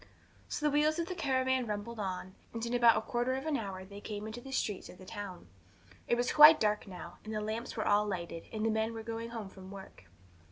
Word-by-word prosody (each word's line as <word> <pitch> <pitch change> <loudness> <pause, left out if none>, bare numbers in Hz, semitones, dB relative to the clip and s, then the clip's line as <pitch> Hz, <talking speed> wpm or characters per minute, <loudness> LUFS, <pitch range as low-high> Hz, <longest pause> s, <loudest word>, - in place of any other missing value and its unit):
So 300 - -2
the 300 - +4
wheels 300 +2 +3
of 335 - 0
the 370 - -3
caravan 260 -6 +1
rumbled 215 +2 -4
on, 185 -1 -4 0.2
and 230 0 -3
in 235 - -3
about 235 -2 +6
a - - +1
quarter 245 +3 0
of 265 +2 -4
an 310 -2 +1
hour 195 -5 -4
they 200 +1 -10
came 210 -1 -5
into 220 +3 -6
the 270 - -9
streets 210 -7 -2
of - - -12
the 185 - -12
town. 190 - -7 0.6
It - - +3
was 245 +1 0
quite 300 +1 +10
dark 210 -1 +1
now, 175 -2 -9
and 215 - -7
the - - 0
lamps 220 +3 -4
were 215 - 0
all 210 +1 +4
lighted, 170 -4 -4
and 220 -1 -2
the 225 - +3
men 220 +1 0
were 225 - -5
going 230 +1 -4
home 225 -3 -5
from 190 -1 -12
work. 190 - -11
220 Hz, 245 wpm, -32 LUFS, 200-245 Hz, 0.6 s, quite